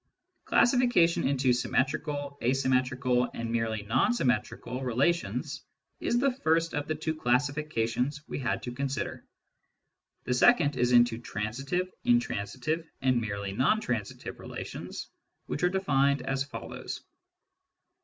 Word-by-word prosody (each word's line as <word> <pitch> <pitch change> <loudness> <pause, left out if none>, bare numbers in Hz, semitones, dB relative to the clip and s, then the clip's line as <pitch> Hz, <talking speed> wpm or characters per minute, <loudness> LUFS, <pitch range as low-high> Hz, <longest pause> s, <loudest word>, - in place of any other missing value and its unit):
•. - - -54 0.4
Classification 240 - +4
into 135 -2 +2
symmetrical, 140 +3 -1
asymmetrical, 130 -1 +1
and 115 0 -3
merely 115 -2 -1
non 110 - +2
symmetrical 125 - -1
relations 140 +8 0 0.4
is 240 - +1
the 275 +2 +3
first 165 -9 +1
of 145 0 -2
the 155 - -1
two 160 +1 -2
classifica 145 -2 0
tions 140 +6 -2
we - - -4
had 125 - -1
to 125 - -4
consider. 135 +2 -3 1.0
The 125 - 0
second 145 - +5
is 125 -1 +2
into 120 -1 +5
transitive, 125 - -2 0.2
intransitive, 165 - 0
and 130 -2 +3
merely 100 -2 -3
non 130 - +2
transitive 115 - -4
relations, - - -7 0.4
which - - -4
are 180 - +4
defined 140 -7 +2
as 135 0 0
follows. 140 - -7
135 Hz, 125 wpm, -29 LUFS, 120-160 Hz, 1.0 s, second